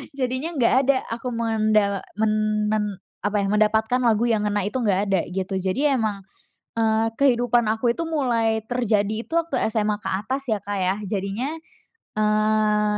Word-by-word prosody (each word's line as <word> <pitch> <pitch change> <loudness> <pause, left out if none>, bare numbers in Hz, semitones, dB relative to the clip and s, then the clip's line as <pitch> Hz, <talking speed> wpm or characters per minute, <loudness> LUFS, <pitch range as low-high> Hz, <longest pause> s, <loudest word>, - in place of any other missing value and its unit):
jadinya 260 +5 -2
nggak 245 -3 +3
ada 275 - +4
aku 235 +2 -4
menda 215 -3 +1 0.2
men 215 0 +1 0.4
men 215 -1 +1 0.4
apa 205 +1 -2
ya, - - 0
mendapatkan 220 +3 +2
lagu 230 -3 +2
yang 215 -2 +1
ngena 205 -1 0
itu 210 +6 -2
nggak 205 -6 +2
ada, 190 -3 +3
gitu. 190 +1 -3
Jadi 230 +11 +1
emang, 215 -6 -1 0.6
eee, 225 0 +2
kehidupan 240 -4 +3
aku 225 +2 +1
itu 335 - -3
mulai 235 -8 +1
terjadi 220 -2 0
itu 330 - -10
waktu 330 -6 0
SMA 210 -1 0
keatas 255 +8 -3
ya 215 -4 0
Kak 205 0 -3
ya 185 0 +1
jadinya, 205 +8 -2 0.7
eee, 215 0 +2
220 Hz, 155 wpm, -23 LUFS, 210-245 Hz, 0.7 s, ada